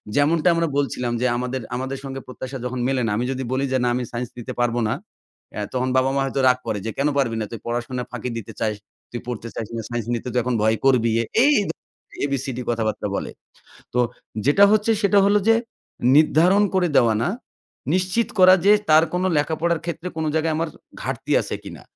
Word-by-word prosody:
যেমনটা 155 +4 +3
আমরা 165 0 +1
বলছিলাম 125 -4 -1
যে - - +1
আমাদের 125 +1 -3
আমাদের 130 +2 -3
সঙ্গে 135 0 -6
প্রত্যাশা 130 +1 -7
যখন 125 0 -3
মেলে 135 -2 0
না। 110 - -1
আমি 120 - -1
যদি 130 0 -3
বলি 135 +1 0
যে 130 - +2
"না 125 - +2
আমি 125 - -1
সাইন্স 120 0 -4
দিতে 120 - -6
পারব 120 -1 +1
না।" - - 0 0.6
আ - - -2
তখন 130 0 0
বাবা 130 +1 +3
মা 140 - +2
হয়তো 135 0 -2
রাগ 125 0 +4
করে 105 - -1
যে 115 - -2
"কেন 140 - +2
পারবি 120 -5 +1
না 110 - -1
তুই 115 - -6
পড়াশোনা 120 +1 -3
ফাঁকি 125 0 -4
দিতে 110 - -7
চাস, 110 -1 0 0.4
তুই 120 - -4
পড়তে 120 -2 -5
চাস 110 - -4
না, 115 - -2
সাইন্স 120 -2 -3
নিতে 120 +1 -3
তুই 125 - +1
এখন 125 0 -1
ভয় 110 +1 +2
করবি" 120 -4 +4 0.3
এই 295 - +5 0.7
এবিসিডি 135 -3 -2
কথাবার্তা 110 -3 -1
বলে। - - -3 0.6
তো 125 - +3 0.5
যেটা 170 +8 +6
হচ্ছে 215 +1 +2
সেটা 200 0 +4
হলো 205 +1 +4
যে 225 - +7 0.6
নির্ধারণ 170 +6 +5
করে 180 -2 +2
দেওয়া 115 -2 +5
না। - - +1 0.7
নিশ্চিত 185 +5 +1
করা 185 0 +8
যে 205 - +8 0.2
তার 155 +1 +7
কোন 180 - 0
লেখাপড়ার 160 +3 0
ক্ষেত্রে 170 +1 -4
কোন 160 - -1
জায়গায় 160 0 +1
আমার 165 +1 -1 0.3
ঘাটতি - - -3
আছে - - -5
কিনা। - - -9
130 Hz, 200 wpm, -22 LUFS, 120-160 Hz, 0.7 s, করা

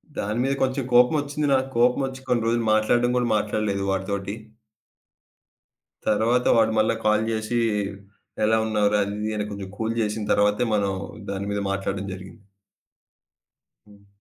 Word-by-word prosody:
దాని 105 +4 -2
మీద 135 +1 +1
కొంచెం 130 0 0
కోపం 125 +5 +5
ఒచ్చింది 145 +1 -2
నాకు. 130 0 +2
కోపం 125 +3 +3
ఒచ్చి 130 0 -8
కొన్ని 120 -2 +1
రోజులు 115 0 +1
మాట్లాడడం 120 +3 +2
కూడా 120 -1 +1
మాట్లాడలేదు 105 -1 -1
వాడితోటి. 100 +1 -3 1.7
తరువాత 115 +4 +2
వాడు 110 -1 +4
మళ్ళీ 110 +1 +2
కాల్ 110 0 +3
చేసి, 110 +2 -2 0.9
"ఎలా 110 +1 +3
ఉన్నావు 105 -2 +2
రా?" 105 - +3
అది, 100 +1 -5
ఇది 110 - -1
అని 105 0 -2
కొంచెం 100 -1 -6
కూల్ 110 0 -1
చేసిన 105 0 -2
తర్వాతే 105 +4 +2
మనం 100 -2 0 0.4
దాని 100 0 -3
మీద 100 0 -1
మాట్లాడ్డం 95 0 -3
జరిగింది. 95 +4 -11 1.4
హ్మ్. 100 -1 -20
110 Hz, 150 wpm, -24 LUFS, 100-120 Hz, 1.7 s, కోపం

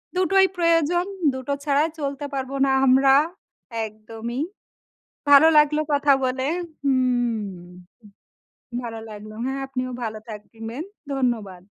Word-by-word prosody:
দুটোই 380 +1 +4
প্রয়োজন। 335 +1 +2 0.3
দুটো 260 +2 -3
ছাড়া 285 +1 +3
চলতে 280 0 -3
পারব 265 -1 -3
না 270 - +2 0.2
আমরা। 270 +1 +6 0.7
একদমই। 225 +3 -6 0.9
ভালো 285 +3 +9
লাগলো 300 +1 +4
কথা 285 0 +4
বলে 260 +1 -1 0.4
হুম। 245 -7 0 1.2
ভালো 225 -2 -6
লাগলো। 215 0 -9
হ্যাঁ, 270 +1 -2
আপনিও 255 -1 -4
ভালো 220 -1 -3
থাকবেন। 225 +5 -7 0.3
ধন্যবাদ। 225 -9 -2
260 Hz, 105 wpm, -23 LUFS, 225-285 Hz, 1.2 s, ভালো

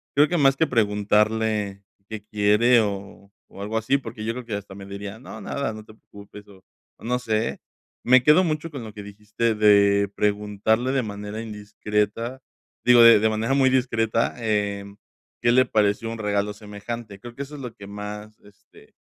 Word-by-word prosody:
Creo 145 +2 +5
que 175 +1 -1
más 135 -2 +4
que 160 - +2
preguntarle 105 -2 +1 0.3
qué 110 -2 -7
quiere 105 +3 +3
o 100 -1 -6 0.2
o 100 - -10
algo 110 +2 -2
así, 125 +5 +1
porque 110 -5 -8
yo 115 - -2
creo 125 0 -7
que 115 - -6
hasta 100 -1 -8
me 100 0 -10
diría: 100 +1 -7
"No, 110 -3 -10
nada, 110 +2 -3
no 110 - -9
te 110 - -16
preocupes", 100 -1 -14
o 95 -2 -18 0.3
o - - -20
no 125 +1 0
sé. 110 -1 -2 0.4
Me 130 0 +5
quedo 150 +6 +6
mucho 155 -1 -2
con 140 -5 -7
lo 110 -2 -9
que 105 - -9
dijiste 105 +3 -2
de 100 -1 +4
preguntarle 105 +4 0
de 135 -1 +1
manera 105 0 -6
indiscreta, 105 +2 -3 0.5
digo, 125 -1 +7
de 115 -2 +8
de 110 +1 +2
manera 110 +4 -1
muy 135 -1 +4
discreta, 115 -3 0
em, 100 -3 -2 0.5
¿qué 120 - +3
le 130 +1 +5
pareció 105 +1 +1
un 115 - -6
regalo 105 -1 -1
semejante?, 105 +1 -8
creo 120 +3 -10
que 140 - -5
eso 145 +2 -10
es 140 - -9
lo 125 -3 -7
que 100 -1 -12
más, 105 +1 -8
este, 100 -1 -21
110 Hz, 190 wpm, -24 LUFS, 105-120 Hz, 0.5 s, de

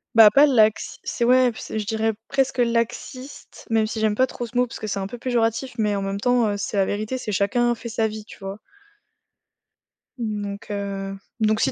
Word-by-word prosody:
bah, 220 -2 +9
pas 280 +5 +7
laxi 220 -6 +2
c'est, - - -2
ouais, 250 0 +5
p 220 - -13
c'est, 220 - -4
je 210 - -3
dirais, 220 +1 0
presque 270 -1 0
laxiste, 240 +3 -2
même 225 -1 +3
si 220 - -4
j'aime 215 -1 +2
pas 255 - +4
trop 245 - -5
ce 240 - -6
mot 250 - +4
parce 235 - -9
que 215 - -5
c'est 200 - -2
un 190 - -3
peu 245 - -8
péjoratif, 240 +1 0
mais 210 -2 +1
en 200 - -1
même 195 0 -3
temps, 245 0 +3
heu, 205 - -1
c'est 205 +1 -3
la 195 - +4
vérité, 215 +6 -2
c'est 215 -4 -4
chacun 240 +5 +2
fait 235 +1 -8
sa 225 -1 +1
vie, 215 0 -7
tu - - -13
vois? 195 0 -6 1.6
Donc 210 -3 -4
heu, 195 -1 -4 0.2
donc 215 0 +2
si 130 - +2
220 Hz, 220 wpm, -23 LUFS, 205-240 Hz, 1.6 s, bah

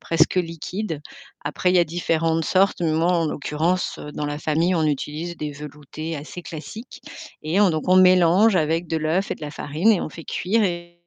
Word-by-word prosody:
presque 165 +2 +2
liquides. 165 -1 -3 0.4
Après 150 +5 0
il 185 - +3
y - - +6
a 175 - +5
différentes 165 0 0
sortes, 190 +4 +2
mais 165 -2 +1
moi 165 +3 +2
en 165 -2 +1
l'occurrence, 160 +5 -1
heu, 150 - -7
dans 150 - -4
la 145 0 -3
famille 165 +4 +1
on 160 -2 +1
utilise 155 +4 -2
des 150 -2 -4
veloutés 150 +2 -7
assez 155 +5 -8
classiques 215 +11 -9 0.4
et 165 +6 +1
on 205 - +6
donc 155 -1 -2
on 185 - +6
mélange 185 +3 +5
avec 165 +1 0
de 160 - -1
l'œuf 160 +5 0
et - - 0
de - - -16
la 150 - -4
farine 155 +9 +1
et 195 - +1
on - - -3
fait 165 +1 -11
cuire 220 +5 0
et 175 -2 -3
165 Hz, 210 wpm, -23 LUFS, 155-180 Hz, 0.4 s, y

